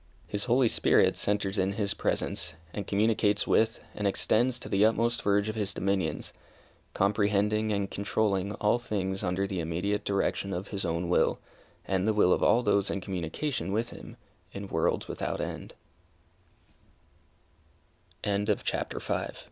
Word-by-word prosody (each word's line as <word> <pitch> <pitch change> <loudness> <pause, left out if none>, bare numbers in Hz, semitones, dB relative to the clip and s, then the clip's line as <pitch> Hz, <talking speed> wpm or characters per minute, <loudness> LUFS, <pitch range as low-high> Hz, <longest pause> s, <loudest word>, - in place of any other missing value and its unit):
His 100 0 -1
Holy 125 +1 +4
Spirit - - +3
centres 100 -1 0
in 95 +1 +1
His 100 -1 -1
presence, 80 - -2 0.2
and 105 - -5
communicates 105 0 +2
with, 110 0 +2
and 105 - -1
extends 120 +5 +2
to - - -8
the 100 +1 +2
utmost 115 +2 +2
verge 100 0 +2
of 110 - -2
His 100 -3 -2
dominions, 95 -5 -1 0.6
comprehending 105 +2 +2
and 100 -1 0
controlling 100 -1 0
all 105 +3 +1
things 95 -4 -2
under 95 0 0
the 95 -2 -3
immediate 90 +6 -1
direction 100 0 0
of 90 +3 -4
His 100 -2 -3
own 85 +1 -1
will, 90 - +2 0.5
and 95 +1 0
the 110 - +2
will 90 -3 +5
of - - 0
all 120 +2 +4
those 100 -4 +2
in 100 - -1
communication 95 - -3
with 115 +3 -1
Him, 115 - -11 0.4
in 100 0 -6
worlds 80 - 0
without - - -3
end! - - -5 2.5
CHAPTER 105 0 -1
VI. - - -2
100 Hz, 150 wpm, -29 LUFS, 95-110 Hz, 2.5 s, will